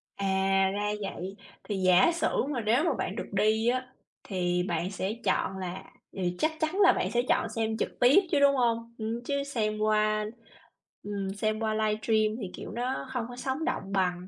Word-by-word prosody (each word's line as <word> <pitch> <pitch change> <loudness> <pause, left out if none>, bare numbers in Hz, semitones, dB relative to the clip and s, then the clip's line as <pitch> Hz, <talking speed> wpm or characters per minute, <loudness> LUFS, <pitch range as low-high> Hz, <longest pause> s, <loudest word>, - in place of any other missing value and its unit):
À, 200 0 -2 0.5
ra 205 +1 -1
vậy! 195 -1 -5 0.3
Thì 210 - -3
giả 185 - +5
sử 335 -1 0
mà 260 -5 -1
nếu 230 +7 +2
mà 330 -3 +2
bạn 195 - -3
được - - -4
đi 215 +3 +2
á, 255 +1 +1 0.4
thì 180 -2 0
bạn 175 +1 -2
sẽ 195 +1 -2
chọn 190 - +1
là 185 -1 -5 0.3
thì 180 -2 -2
chắc 315 - +2
chắn 315 +5 -1
là 395 -3 +7
bạn - - -1
sẽ 240 - +2
chọn 225 - +2
xem 220 0 -1
trực - - -3
tiếp 260 +10 +6
chứ, 295 - +3
đúng 280 0 +5
hông? 235 -2 0
Ừm, 225 +2 -3
chứ 280 +1 -1
xem 215 -6 -2
qua 215 0 +2 0.8
ừm, 200 -2 -3
xem 215 +1 -1
qua 220 -1 0
livestream 215 0 +1
thì, 190 -3 -5
kiểu, - - -7
nó 240 - -3
hông 245 -3 -2
có 245 - -8
sống 265 +4 -3
động 195 - -2
bằng. 180 -2 0
215 Hz, 200 wpm, -28 LUFS, 195-245 Hz, 0.8 s, là